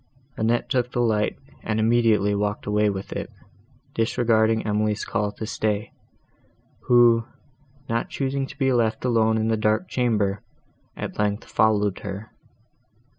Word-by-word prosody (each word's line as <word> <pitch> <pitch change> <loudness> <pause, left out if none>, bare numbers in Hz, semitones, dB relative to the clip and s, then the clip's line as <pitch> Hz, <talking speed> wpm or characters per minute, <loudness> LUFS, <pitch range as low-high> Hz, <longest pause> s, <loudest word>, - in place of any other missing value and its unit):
Annette 115 +2 0
took 125 -1 0
the - - -2
light, 110 -3 +1 0.2
and 110 0 -2
immediately 110 -3 +3
walked 105 0 -2
away 105 0 +2
with 95 -1 -5
it, - - -5 0.6
disregarding 115 -1 +2
Emily's 105 0 0
call 105 -2 -1
to 110 - -6
stay, 105 -1 -2 1.0
who, 120 -2 +5 0.6
not 115 +1 -1
choosing 135 0 -2
to - - -12
be 135 -3 +2
left 115 0 0
alone 110 -2 +3
in 110 0 0
the 110 - +1
dark 110 +11 +1
chamber, 105 -5 0 0.6
at - - -6
length 105 0 0
followed 105 -2 +1
her. 100 +2 -7
110 Hz, 135 wpm, -24 LUFS, 105-115 Hz, 1.0 s, who